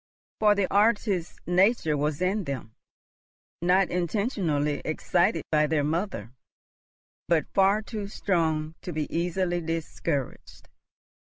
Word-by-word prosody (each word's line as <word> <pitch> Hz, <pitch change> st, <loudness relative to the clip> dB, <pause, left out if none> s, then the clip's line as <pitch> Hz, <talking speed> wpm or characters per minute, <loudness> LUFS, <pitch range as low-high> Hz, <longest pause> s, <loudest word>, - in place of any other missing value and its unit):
For 210 Hz, -1 st, +5 dB
the 200 Hz, -1 st, +2 dB
artist 205 Hz, -4 st, +1 dB
nature 180 Hz, -3 st, +3 dB
was 150 Hz, +2 st, -1 dB
in 195 Hz, +1 st, 0 dB
them, 130 Hz, -6 st, -5 dB, 0.9 s
not 180 Hz, +2 st, +3 dB
intentionally 175 Hz, -, 0 dB
excited 165 Hz, +1 st, +1 dB
by 150 Hz, -1 st, +3 dB
their 150 Hz, -1 st, +1 dB
mother, 160 Hz, -, -2 dB, 1.0 s
but 160 Hz, -4 st, +1 dB
far 195 Hz, +2 st, +3 dB
too 210 Hz, -3 st, -5 dB
strong 160 Hz, -6 st, -1 dB
to 180 Hz, -, -5 dB
be 155 Hz, -2 st, -2 dB
easily 175 Hz, +1 st, 0 dB
discouraged. 165 Hz, -3 st, -4 dB
175 Hz, 110 wpm, -27 LUFS, 155-195 Hz, 1.0 s, For